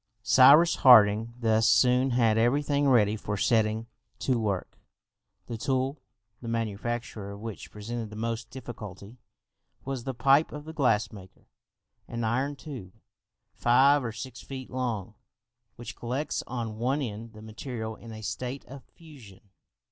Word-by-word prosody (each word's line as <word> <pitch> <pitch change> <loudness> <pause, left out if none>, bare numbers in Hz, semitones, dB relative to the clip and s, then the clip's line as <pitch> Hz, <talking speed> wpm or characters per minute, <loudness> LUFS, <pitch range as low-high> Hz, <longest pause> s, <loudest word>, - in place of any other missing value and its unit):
Cyrus 145 +8 +6
Harding 110 -2 +6
thus 110 -1 +2
soon 125 +3 +4
had 115 -3 +3
every 120 +6 +2
thing 145 -1 +1
ready 110 -4 +4
for 105 -1 -4
setting 110 +1 +1 0.3
to 130 -3 0
work. 100 -4 -3 0.7
The 115 -2 -6
tool, 130 +3 -1 0.4
the 120 - -8
manufacture 115 -1 -3
of 100 0 -8
which 110 -1 -7
presented 110 +1 -6
the 105 - -10
most 115 +1 -4
difficulty, 115 -3 -9 0.7
was 135 -2 -4
the 135 0 -4
pipe 140 +5 +3
of 150 0 -8
the 160 - -8
glass 125 -9 +1
maker, 95 -4 -14 0.6
an 115 0 -4
iron 130 +6 0
tube, 130 - -9 0.6
five 135 +4 +4
or 115 - -3
six 125 +2 -8
feet 130 -2 -8
long, 120 -5 -3 0.6
which 120 0 -8
collects 130 +6 -3
on 115 -3 -5
one 135 +5 0
end 115 -1 -7
the 110 0 -12
material 110 0 -6
in 115 0 -12
a 110 0 -9
state 125 +6 -5
of 135 0 -11
fusion. 110 - -16
120 Hz, 150 wpm, -28 LUFS, 110-130 Hz, 0.7 s, Cyrus